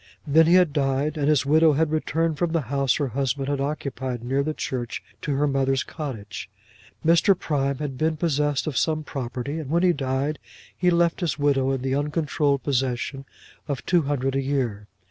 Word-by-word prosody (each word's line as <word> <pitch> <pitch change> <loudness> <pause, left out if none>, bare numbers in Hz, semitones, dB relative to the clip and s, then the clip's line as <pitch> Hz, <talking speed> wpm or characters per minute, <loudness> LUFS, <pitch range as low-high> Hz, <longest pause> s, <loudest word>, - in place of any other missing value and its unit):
Then 160 +2 +5
he 175 - +6
had 180 -5 +4
died, 140 +1 0
and 145 -2 -1
his 150 -2 +3
widow 155 +2 +5
had 155 +1 +1
returned 155 0 0
from 170 -2 0
the 165 - +2
house 140 -2 +2
her 145 -3 -1
husband 135 +2 -1
had 140 -1 -1
occupied 135 -4 -3
near 135 +3 0
the 155 +2 -1
church 120 -2 -4 0.2
to 145 - -1
her 145 +2 +2
mother's 135 -1 +1
cottage. 110 - -6 0.6
Mr. 170 +3 +5
Prime 140 -3 -1
had 140 -3 -5
been 160 0 +1
possessed 145 -3 0
of 145 -5 0
some 155 -1 0
property, 135 +2 -4
and 150 -4 -6
when 170 +3 +2
he 180 -1 +5
died 135 +1 -2 0.4
he 180 - +2
left 170 -1 +2
his 165 -6 -1
widow 140 -2 +2
in 135 -2 -1
the 130 0 0
uncontrolled 145 -1 0
possession 135 0 -1 0.4
of 140 -3 -4
two 175 -2 +3
hundred 135 -2 -1
a 135 - +1
year. 125 -7 -2
140 Hz, 190 wpm, -24 LUFS, 135-155 Hz, 0.6 s, he